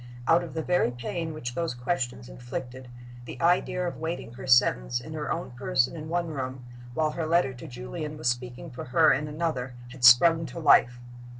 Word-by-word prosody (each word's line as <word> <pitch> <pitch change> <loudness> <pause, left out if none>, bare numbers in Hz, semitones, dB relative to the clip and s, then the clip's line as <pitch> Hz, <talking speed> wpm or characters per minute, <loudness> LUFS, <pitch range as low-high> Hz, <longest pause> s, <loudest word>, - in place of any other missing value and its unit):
Out 170 +1 +4
of 170 - -9
the 160 - -2
very 180 -7 +2
pain 140 +7 -4
which 125 -6 -6
those 165 -4 -2
questions 120 - -3
inflicted, 120 - -7 0.4
the 125 - -9
idea 180 +1 +1
of 175 - -5
waiting 160 -7 -5
her 130 +2 -9
sentence - - +3
in - - -9
her - - -4
own - - -3
person 125 +3 0
in 155 -1 -7
one 170 0 -1
room, 130 -3 -5 0.3
while 155 +1 +1
her 160 0 -3
letter 165 -5 +2
to 125 +6 -10
Julian 150 +5 -6
was 155 - -3
speaking 120 +1 -3
for 125 - -7
her 125 - +4
in 150 +2 -2
another, 150 -5 -3 0.2
had 130 0 -11
sprung 160 +6 +7
to - - -8
life. 125 -5 +5
130 Hz, 195 wpm, -27 LUFS, 125-165 Hz, 0.4 s, sprung